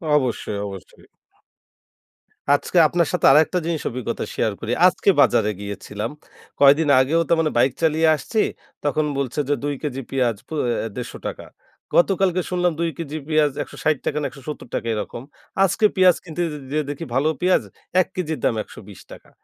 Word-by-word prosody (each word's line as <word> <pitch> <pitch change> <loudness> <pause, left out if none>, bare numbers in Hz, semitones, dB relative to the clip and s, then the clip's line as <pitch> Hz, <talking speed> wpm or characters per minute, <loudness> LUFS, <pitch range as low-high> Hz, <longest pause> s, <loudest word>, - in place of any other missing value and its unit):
অবশ্যই, 125 -6 -1
অবশ্যই। 95 -2 -11 1.5
আজকে 145 +5 +1
আপনার 170 0 +1
সাথে - - +1
আরেকটা 155 +5 +4
জিনিস 165 -3 -1
অভিজ্ঞতা 125 -1 -4
শেয়ার - - 0
করি। - - -4 0.2
আজকে - - +1
বাজারে 105 -1 +3
গিয়েছিলাম। 105 +2 -5 0.5
কয়দিন 145 +2 +5
আগেও 140 +6 +2
তার 170 - +3
মানে 155 -2 +1
বাইক 125 +2 +3
চালিয়ে 160 0 +3
আসছি, 220 - -3 0.4
তখন 150 +1 +1
বলছে 140 +1 -2
যে 145 - +4
২ 145 0 -1
কেজি 135 -3 -3
পিয়াজ 125 -4 +1
পো - - -9 0.3
অ্যা 115 - -3
১৫০ 125 - -5 0.2
টাকা। - - -7 0.5
গতকালকে 185 0 +3
শুনলাম 180 -1 +2
২ 170 0 +1
কেজি 155 -2 -5
পিয়াজ 155 -2 +3
১৬০ 155 -1 -1
টাকা - - -1
না - - -2
১৭০ 140 -2 -9
টাকা 115 - -3
এরকম। 105 - -5 0.4
আজকে 195 +3 +2
পেঁয়াজ 185 -2 +6
কিনতে 165 0 -5
যে 150 - -6
যেয়ে 150 0 0
দেখি 145 +3 -5
ভালো 140 +3 +2
পেঁয়াজ 180 +1 +3 0.4
১ - - -2
কেজির 160 -4 -3
দাম - - +2
১২০ 100 -2 -13
টাকা। - - -13
150 Hz, 165 wpm, -22 LUFS, 130-165 Hz, 1.5 s, পেঁয়াজ